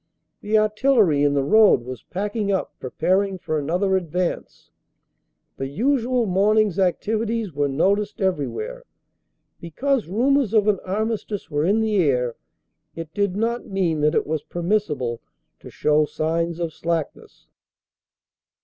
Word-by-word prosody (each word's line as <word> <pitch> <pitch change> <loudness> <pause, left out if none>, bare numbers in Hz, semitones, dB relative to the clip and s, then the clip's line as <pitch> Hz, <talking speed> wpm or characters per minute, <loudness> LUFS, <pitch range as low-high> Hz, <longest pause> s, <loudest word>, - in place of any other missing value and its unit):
The 215 +1 +1
artillery 215 - +3
in 145 0 +2
the 140 - +2
road 210 - +5
was 130 0 -7
packing 205 +2 -3
up 190 - -2
pre 130 - -6
paring 190 +6 0
for 155 -3 -2
another 180 +6 0
advance. 180 0 -3 0.9
The 135 - -3
usual 245 - +1
morning 210 +3 +3
s 190 - -6
activities 215 +2 -1
were 145 0 0
noticed 200 +9 0
everywhere. 430 - -2 0.8
Because 255 - -1
rumors 245 +3 +1
of 215 -1 +4
an 205 -3 +2
armistice 210 -1 -3
were 145 +1 0
in 205 +5 +2
the 215 -2 +1
air 125 -8 +1 0.6
it 165 -1 -8
did 200 -2 0
not 230 +3 -1
mean 175 -6 0
that 150 0 +2
it - - +1
was 155 0 -2
permissible 165 - -2 0.4
to - - -12
show 150 0 +2
signs 165 +2 -2
of 165 -2 -3
slackness. 165 -2 -4
190 Hz, 140 wpm, -22 LUFS, 155-215 Hz, 0.9 s, road